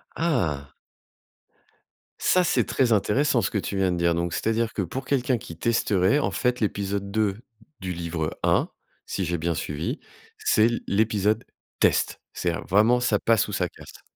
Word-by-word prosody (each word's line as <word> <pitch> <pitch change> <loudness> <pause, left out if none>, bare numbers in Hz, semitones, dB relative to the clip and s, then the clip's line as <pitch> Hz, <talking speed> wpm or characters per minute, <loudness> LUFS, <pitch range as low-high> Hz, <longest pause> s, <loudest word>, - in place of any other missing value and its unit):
Ah. 85 - -1 1.5
Ça, 185 - +3
c'est 175 - +2
très 125 -4 +2
intéressant 120 +5 +2
ce - - 0
que - - -2
tu 100 0 -3
viens 95 -1 +2
de 90 - -1
dire. 85 0 +2
Donc 85 0 -1
c'est-à-dire 115 +5 0
que - - -1
pour 125 +9 -4
quelqu'un 130 -2 +1
qui 110 -9 -10
testerait, 105 - +2
en - - 0
fait, 125 0 0
l'épisode 100 -2 -2
2 105 -1 0 0.4
du 95 -1 -4
livre 85 -2 -3
1, - - +2 0.4
si 95 - -2
j'ai 85 +1 -1
bien 85 +1 -1
suivi, 75 0 -3 0.4
c'est 110 - +3
l 120 0 -2
l'épisode 105 +1 +1 0.4
test. - - +2
C'est 85 -1 -1 0.2
vraiment 110 +6 +4
ça 115 -4 +1
passe 115 -3 +2
ou 105 - -6
ça 90 -2 0
casse. - - -14
100 Hz, 170 wpm, -25 LUFS, 85-115 Hz, 1.5 s, vraiment